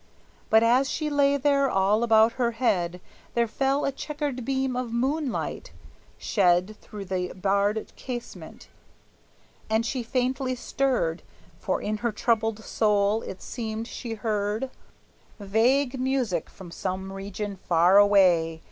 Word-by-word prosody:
But 220 +1 +5
as 255 +4 +3
she 305 -1 -2
lay 280 -1 +3
there, 280 0 +2
all 195 +3 +2
about 225 -1 +5
her 240 -2 -1
head 180 -7 0 0.4
There 235 0 +3
fell 270 +5 0
a 275 - +1
checkered 285 -2 -4
beam 265 0 -1
of 250 -2 -3
moonlight, 265 +3 -2 0.5
shed 185 +1 +2
Through 205 -2 -9
the 180 -1 -2
barred 200 +3 0
casement; 245 -2 -8 1.0
and 220 +1 +1
she 255 +1 -2
faintly 255 +1 -1
stirred, 245 -10 -1 0.4
For 185 - -1
in 215 +1 -1
her 235 +2 -1
troubled 220 0 0
soul 210 0 +1
it 190 - -8
seemed 225 -1 -5
she 235 -2 -6
heard 215 +3 -2 0.7
Vague 245 +6 +1
music 255 - -1
from 180 -3 -12
some 190 +2 -4
region 200 +1 -5
far 175 +1 +4
away! 180 -6 +4
225 Hz, 130 wpm, -26 LUFS, 200-255 Hz, 1.0 s, But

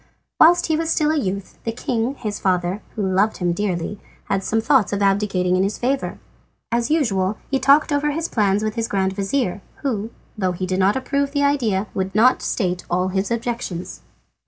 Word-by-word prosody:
Whilst 345 +2 +6
he 320 - +1
was 325 +1 -1
still 305 -2 +2
a - - +1
youth 195 -4 -4
the 230 - -1
king, 235 +2 -2
his 210 -5 -4
father, 180 +1 0
who 210 - -1
loved 195 +3 +1
him 175 -2 0
dearly, 190 0 -2 0.2
had 195 0 -1
some 225 - 0
thoughts 240 -1 +3
of 200 0 0
abdicating 195 -2 +2
in 185 - +2
his 195 +2 -1
favour. 265 +2 -1 0.5
As 235 0 0
usual 215 - +1
he 270 - +2
talked 280 +4 +4
over 290 +1 +1
his 320 +3 -2
plans 205 -2 +1
with 215 0 -1
his 230 -1 -2
grand 190 -1 0
vizir, 200 0 -1 0.2
who, 225 -6 -1 0.3
though 185 -4 0
he 185 +1 -3
did 185 +1 -1
not 195 +2 +3
approve 280 +2 -1
the 285 -1 +1
idea, 235 -9 +1
would 190 0 -3
not 245 +4 +5
state 180 -5 -1
all 180 +1 +1
his 190 +1 -1
objections. 230 - -4
210 Hz, 195 wpm, -21 LUFS, 190-265 Hz, 0.5 s, Whilst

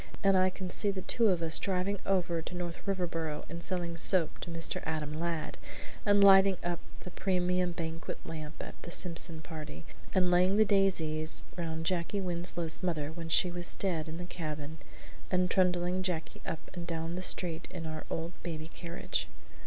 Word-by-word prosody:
"And 195 -1 +5
I 185 0 +5
can 185 0 -6
see 205 - +2
the 190 -2 -2
two 230 -2 +3
of 180 -4 +2
us 160 -1 +2
driving 195 +1 0
over 175 -3 +1
to 175 - -7
North 175 +1 -5
Riverboro 165 -5 -2
and 170 +2 -6
selling 175 -2 -2
soap 170 0 +3
to - - -6
Mr. 165 -1 -3
Adam 155 -2 -2
Ladd; 165 0 -3 0.5
and 205 0 +6
lighting 195 -1 +8
up 175 -1 -1 0.2
the 180 - -8
premium 180 -1 +1
banquet 165 0 -4
lamp 155 -1 -6
at - - -7
the - - -8
Simpson 170 -2 +3
party; 150 - -8 0.3
and 180 -1 +4
laying 180 +3 +4
the 215 - +6
daisies 165 -6 +2
round 165 -2 -3
Jacky 180 +3 0
Winslow's 175 -2 0
mother 155 -5 -1
when 165 0 -6
she 180 +2 +5
was 175 0 -4
dead 165 -5 0
in 160 - -5
the 175 - -5
cabin; 155 -3 -5 0.5
and 180 -1 +2
trundling 180 -1 +2
Jacky 180 -4 -3
up 165 - -5
and 175 -1 -6
down 165 0 -2
the 180 - -3
street 175 -2 -1
in 170 -3 -6
our 155 -1 -4
old 165 +1 -2
baby 160 -2 -5
carriage!" 170 0 -3
175 Hz, 180 wpm, -32 LUFS, 160-185 Hz, 0.5 s, lighting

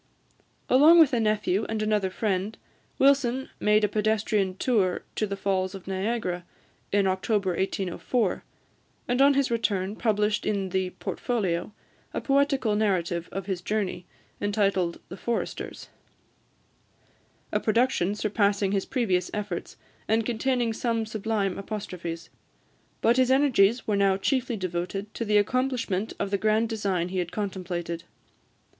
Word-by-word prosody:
Along 300 +6 +7
with 305 -4 +6
a 240 - +3
nephew 215 -2 +1
and 220 -1 -1
another 210 -3 +1
friend, 195 +1 -2 0.4
Wilson 265 -2 +3
made 210 0 +3
a - - +5
pedestrian 210 -2 0
tour 200 -8 +1
to 215 - -1
the 200 0 -4
Falls 190 -1 -1
of 190 - -10
Niagara, 190 -2 -2 0.5
in 200 -1 +3
October 190 +1 +1
1804, 190 +4 -1 0.6
and 245 +2 +1
on 280 0 +6
his 275 -3 +1
return 205 -4 0
published 210 -2 +1
in 195 -2 -1
the 190 0 0
"Portfolio" 190 -7 -2 0.4
a - - +1
poetical 275 -5 +2
narrative 180 -5 0
of 195 -1 -4
his 190 -3 -3
journey, 195 -3 -2 0.3
entitled 200 -4 +1
"The 185 - -8
Foresters," 235 +3 -4 1.6
a - - +1
production 215 -4 +1
surpassing 205 -2 +1
his 195 -1 -1
previous 190 -9 0
efforts, 205 -4 -4 0.3
and 220 0 +2
containing 240 0 0
some 230 -1 -1
sublime 215 -3 -2
apostrophes. 180 -5 -6 0.7
But 235 +2 +4
his 255 -1 +4
energies 255 -5 +4
were 215 -3 +1
now 195 -1 +3
chiefly 245 +2 0
devoted 185 +3 -4
to - - -3
the 210 0 +3
accomplishment 230 -3 0
of 200 - -2
the 200 - +1
grand 220 +2 +2
design 195 -6 -1
he 185 0 -2
had 175 -1 -2
contemplated. 175 -4 -4
210 Hz, 135 wpm, -26 LUFS, 190-230 Hz, 1.6 s, Along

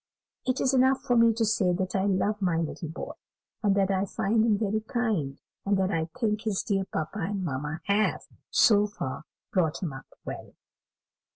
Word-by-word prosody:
It 255 0 +1
is 265 - +2
enough 260 0 +4
for 250 -3 +2
me 230 0 +6
to 225 0 +1
say 205 -4 +2
that 185 +2 -2
I 190 0 +2
love 205 +2 +1
my 175 -4 +2
little 165 +1 -3
boy, 160 - -6 0.5
and 205 -4 +3
that 195 -1 +2
I 190 0 +1
find 215 +3 +1
him 220 -3 +3
very 215 0 0
kind, 215 - -1 0.2
and 200 0 +2
that 190 0 +1
I 160 -2 0
think 215 -3 +1
his 215 -4 -1
dear 195 -2 0
papa 160 +4 -4
and 195 +2 -2
mamma 150 0 -3
have, 205 +2 +1 0.3
so 210 -2 +5
far, 150 -7 -5 0.3
brought 170 -2 +1
him 160 -6 -2
up 135 - -10 0.2
well." - - -7
200 Hz, 190 wpm, -28 LUFS, 180-220 Hz, 0.5 s, me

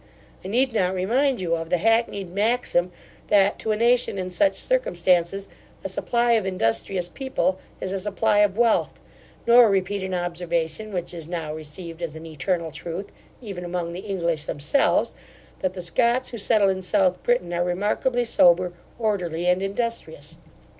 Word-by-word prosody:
I - - -6
need 245 +5 +1
not 190 -4 +1
remind 245 +8 +1
you 170 -2 0
of 165 0 -5
the 180 - +2
hackneyed 210 -2 +1
maxim, 200 -3 +1 0.4
that, 200 -1 +3
to 220 - -1
a - - +2
nation 235 -1 +2
in 185 -1 -4
such 295 +11 +2
circumstances, 185 - +1 0.4
a 195 - -3
supply 235 +5 0
of 225 -3 +3
industrious 180 - 0
people 190 -5 -1 0.2
is 185 - -3
a 195 - -1
supply 205 +2 +1
of 205 -1 +3
wealth; 235 -1 +2 0.5
nor 235 -1 +7
repeat 195 0 0
an 190 -1 -3
observation, 175 +2 -2
which 180 -2 -4
is 165 -3 -6
now 165 -3 -4
received 160 +2 -8
as 165 -3 -4
an 160 +1 -9
eternal 165 +2 -2
truth, 175 +6 -6 0.3
even 195 -5 -6
among 175 -1 -3
the 175 - -5
English 170 -6 -2
themselves, 150 - +1 0.5
that 185 0 -2
the 180 - -5
Scots 240 +8 +1
who 235 - -7
settle 200 -1 +3
in 190 0 -1
South 185 -1 +1
Britain 240 -8 0
are 175 0 +1
remarkably 210 +7 0
sober, 180 -4 +4 0.2
orderly, 180 -7 -1
and 180 +1 +3
industrious. 230 - -4
190 Hz, 165 wpm, -24 LUFS, 175-220 Hz, 0.5 s, nor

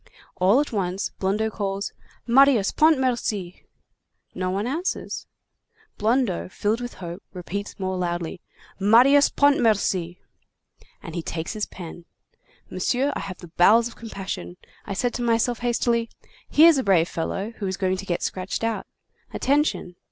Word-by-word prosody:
All 195 +8 +4
at 295 - -1
once 190 -3 -2
Blondeau 210 +3 0
calls, 200 -1 -3 0.3
'Marius 245 -4 +5
Pontmercy!' 250 - +1 0.7
No 185 -1 -2
one 195 +3 -1
answers. 320 +9 -3 0.7
Blondeau, 220 -4 +1
filled 215 +5 -1
with 245 -1 -6
hope, 175 +1 -7
repeats 200 +3 -5
more 190 -1 -2
loudly: 175 0 -3 0.4
'Marius 250 +8 +6
Pontmercy!' 210 -10 +2 0.9
And - - -8
he 170 - -3
takes 160 0 -4
his 215 -1 -3
pen. 175 -1 -10 0.6
Monsieur, 270 +3 0
I - - -2
have 185 -2 -6 0.2
bowels 225 +6 +6
of 235 - -12
compassion. 190 - -6 0.3
I - - -3
said 245 +4 0
to - - -3
myself 235 0 +1
hastily: 235 -1 0 0.4
'Here's 320 -1 +6
a - - -1
brave 180 -4 +3
fellow 195 +6 -3
who 200 - -3
is 190 0 -3
going 185 -1 0
to 195 - -6
get 175 - -1
scratched 185 +4 -3
out. 225 -4 -2 0.4
Attention. 280 - 0
205 Hz, 140 wpm, -24 LUFS, 185-245 Hz, 0.9 s, Marius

